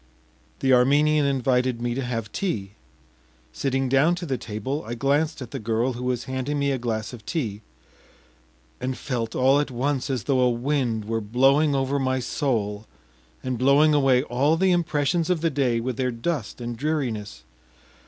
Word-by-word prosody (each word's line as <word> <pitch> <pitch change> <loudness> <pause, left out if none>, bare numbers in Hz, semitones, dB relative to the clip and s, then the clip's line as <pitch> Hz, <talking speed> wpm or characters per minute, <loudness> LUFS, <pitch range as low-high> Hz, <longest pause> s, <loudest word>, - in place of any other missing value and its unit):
The 130 -1 +3
Armenian 145 +4 +4
invited 130 -2 +1
me 120 0 -1
to 135 +2 -2
have 115 -3 -4
tea. 105 - -3 0.8
Sitting 135 - -1
down 135 +7 +3
to 175 0 -6
the 135 -5 -1
table, 115 +6 -4
I 120 +2 -5
glanced 145 +4 0
at 120 - -11
the 135 - -4
girl, 115 +3 0
who 120 +1 -6
was 125 -1 -1
handing 130 +3 -3
me 140 0 +1
a 135 - -1
glass 110 -1 -3
of 115 -3 -10
tea, 110 - -3 1.2
and 130 0 -3
felt 120 -5 -3
all 135 +2 +4
at 145 - -1
once 135 +2 -1
as 130 -4 -1
though 135 -2 +1
a 125 -1 +4
wind 120 -3 -1
were 115 +1 -2
blowing 135 +7 +3
over 135 +1 0
my 130 -1 0
soul 110 -6 -2 0.6
and 130 -2 -3
blowing 140 +4 +5
away 135 -3 +4
all 145 +4 +1
the 190 +2 +3
impressions 165 -1 +1
of 180 -4 +1
the 165 -1 +1
day 130 -4 +1
with 125 +1 -3
their 130 -1 0
dust 120 0 -3
and 120 0 -4
dreariness. 120 - -3
130 Hz, 175 wpm, -24 LUFS, 120-145 Hz, 1.2 s, blowing